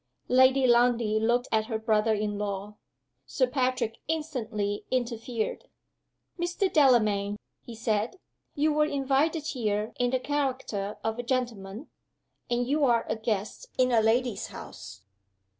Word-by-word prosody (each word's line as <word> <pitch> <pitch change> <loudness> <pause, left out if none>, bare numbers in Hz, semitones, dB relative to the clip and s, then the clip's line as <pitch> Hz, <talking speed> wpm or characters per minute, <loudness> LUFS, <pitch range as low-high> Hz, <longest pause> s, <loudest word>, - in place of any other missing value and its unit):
Lady 260 +1 +5
Lundie 235 -3 +3
looked 240 +3 +1
at 220 -1 +1
her 225 - -1
brother 220 0 +2
in 210 -1 -2
law. 205 0 -4 0.5
Sir 260 - +2
Patrick 255 -3 -1
instantly 230 -10 -2
interfered. 235 -2 -2 0.7
"Mr. 350 +2 0
Delamayn," 215 -8 +3 0.2
he 235 - -10
said, 220 - -1 0.4
"you 300 +1 +2
were 300 0 +3
invited 285 +3 +1
here 215 -6 -1
in 245 0 +2
the 260 +1 +1
character 260 -8 -2
of 225 +1 -2
a - - -2
gentleman, 235 -2 -3 0.6
and 240 0 +1
you 290 +4 +1
are 235 -4 +3
a - - +1
guest 220 - -3
in 255 0 +3
a 230 -2 +4
lady's 225 -1 +1
house." 100 -2 -10
240 Hz, 135 wpm, -28 LUFS, 215-260 Hz, 0.7 s, Lady